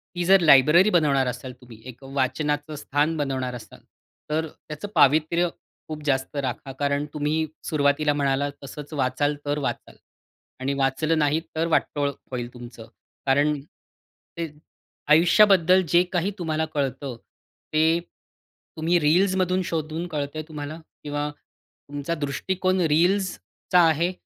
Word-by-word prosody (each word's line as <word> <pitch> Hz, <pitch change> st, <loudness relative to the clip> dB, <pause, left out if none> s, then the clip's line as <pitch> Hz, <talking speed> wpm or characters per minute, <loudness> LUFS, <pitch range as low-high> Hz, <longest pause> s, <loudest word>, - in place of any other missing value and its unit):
ती 175 Hz, -, -1 dB
जर 195 Hz, +2 st, +6 dB
लायब्ररी 155 Hz, +5 st, +6 dB
बनवणार 145 Hz, -8 st, +2 dB
असाल 125 Hz, +1 st, -5 dB
तुम्ही. 115 Hz, -3 st, -14 dB
एक 125 Hz, +2 st, -12 dB
वाचनाचं 145 Hz, +3 st, -2 dB
स्थान 150 Hz, +2 st, 0 dB
बनवणार 130 Hz, -3 st, -2 dB
असाल, 120 Hz, -, -11 dB, 0.5 s
तर 160 Hz, +1 st, 0 dB
त्याचं 155 Hz, +4 st, -9 dB
पावित्र्य 160 Hz, +5 st, +4 dB, 0.4 s
खूप 155 Hz, -1 st, -7 dB
जास्त 135 Hz, 0 st, -1 dB
राखा 135 Hz, -1 st, -3 dB
कारण 145 Hz, 0 st, 0 dB
तुम्ही 150 Hz, +2 st, 0 dB, 0.2 s
सुरुवातीला 145 Hz, 0 st, +2 dB
म्हणालात 140 Hz, 0 st, 0 dB
तसंच, 145 Hz, +2 st, -9 dB
"वाचाल 145 Hz, +2 st, 0 dB
तर 145 Hz, +1 st, -1 dB
वाचाल." 140 Hz, -, -4 dB, 0.6 s
आणि 135 Hz, +2 st, -1 dB
वाचलं 140 Hz, +4 st, 0 dB
नाही 150 Hz, +1 st, +2 dB, 0.2 s
तर 165 Hz, +1 st, 0 dB
वाटोळं 145 Hz, -3 st, 0 dB, 0.2 s
होईल 120 Hz, -1 st, -4 dB
तुमचं 120 Hz, -2 st, -11 dB, 0.4 s
कारण 145 Hz, +2 st, +2 dB, 0.8 s
ते 170 Hz, -, -2 dB, 0.7 s
आयुष्याबद्दल 185 Hz, +2 st, +5 dB
जे 175 Hz, +2 st, +5 dB
काही 180 Hz, +3 st, 0 dB
तुम्हाला 160 Hz, -2 st, -1 dB
कळतं, 135 Hz, -2 st, -2 dB, 0.6 s
ते 160 Hz, +2 st, +3 dB, 0.8 s
तुम्ही 170 Hz, +2 st, +2 dB
रील्समधून 185 Hz, +3 st, +2 dB
शोधून 160 Hz, +1 st, -3 dB
कळतंय 150 Hz, -1 st, -4 dB
तुम्हाला 155 Hz, 0 st, -7 dB, 0.2 s
किंवा 145 Hz, 0 st, -2 dB
तुमचा 145 Hz, +1 st, -9 dB
दृष्टिकोन 185 Hz, +6 st, -1 dB
रील्सचा 180 Hz, +3 st, +1 dB
आहे 165 Hz, +3 st, +1 dB
150 Hz, 125 wpm, -24 LUFS, 140-165 Hz, 0.8 s, जर